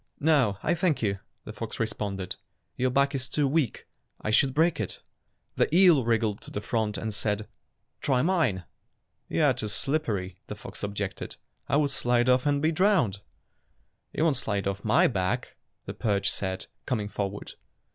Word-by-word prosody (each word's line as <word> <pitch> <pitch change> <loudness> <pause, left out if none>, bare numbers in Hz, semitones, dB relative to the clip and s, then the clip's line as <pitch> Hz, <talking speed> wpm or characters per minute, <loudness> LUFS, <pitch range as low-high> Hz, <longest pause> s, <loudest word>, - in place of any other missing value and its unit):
"No, 140 -10 +3
I 170 - +2
thank 170 -6 +1
you," 100 -2 0 0.2
the 105 - -8
fox 110 +1 -6
responded. 100 -4 -3 0.4
"Your 130 +1 +1
back 140 +2 +2
is 130 -1 -2
too 145 +1 +1
weak. 140 -4 0 0.3
I 110 - -2
should 135 +5 +4
break 160 -1 +3
it." 110 - -3 0.6
The - - +4
eel 175 -7 +6
wriggled 115 -3 +1
to - - -11
the - - -3
front 105 -1 -1
and 110 +1 -3
said, 105 0 -1 0.5
"Try 130 -2 +2
mine." 155 - +1 0.7
"You - - +1
are - - +5
too 110 - -3
slippery," 105 - 0
the 105 - -5
fox 100 - -9
objected. 100 -1 -4 0.3
"I - - +3
would 145 -2 +2
slide 120 -2 +2
off 125 +2 +3
and 145 0 +1
be 160 - +3
drowned." 165 - +2 0.9
"You 155 - -1
won't 155 -5 +3
slide 100 -5 -1
off 100 0 -3
my 110 - +4
back," 95 -6 -1 0.3
the - - -5
perch 100 -2 0
said, 95 -1 -2 0.2
coming 110 -6 -1
forward. 100 -1 -4
115 Hz, 170 wpm, -27 LUFS, 100-145 Hz, 0.9 s, eel